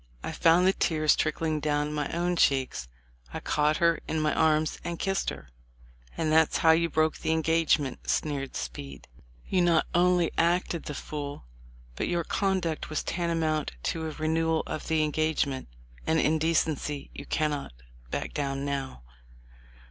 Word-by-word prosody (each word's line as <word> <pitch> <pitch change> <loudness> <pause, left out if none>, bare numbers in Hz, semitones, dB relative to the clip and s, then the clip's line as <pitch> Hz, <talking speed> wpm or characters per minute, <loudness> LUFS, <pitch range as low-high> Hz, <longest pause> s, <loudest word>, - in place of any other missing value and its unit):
I - - -3
found 170 +2 +4
the 190 - +5
tears 155 -4 +2
trickling 155 0 0
down 150 0 0
my 150 -2 -2
own 175 +1 0
cheeks. 135 - +1 0.5
I - - -2
caught 150 +1 +1
her 170 -1 +3
in 160 - -1
my 155 0 +1
arms 155 -1 +2
and 170 0 -4
kissed 195 0 0
her." 65 - -9 0.7
"And 155 -1 0
that's 160 0 +4
how 160 - +5
you 170 +1 +3
broke 155 0 +1
the - - -3
engagement," 160 -3 +1
sneered 140 -3 -1
Speed. 70 +3 -6 0.4
"You 185 - +2
not 170 -2 +3
only 175 -1 +3
acted 170 0 +1
the 150 - -5
fool, 145 - -6 0.5
but - - -2
your 175 -1 0
conduct 185 -4 -1
was 155 - -2
tantamount 165 - -1
to 160 -1 -2
a - - -3
renewal 160 +1 0
of - - -5
the 160 -1 +2
engagement, 150 -3 0 0.4
and 160 0 +3
in 155 +1 +2
decency 155 -3 0
you 140 - -9
cannot 150 - -1 0.4
back - - -3
down 140 -1 -2
now." 135 - -4
155 Hz, 155 wpm, -28 LUFS, 150-165 Hz, 0.7 s, the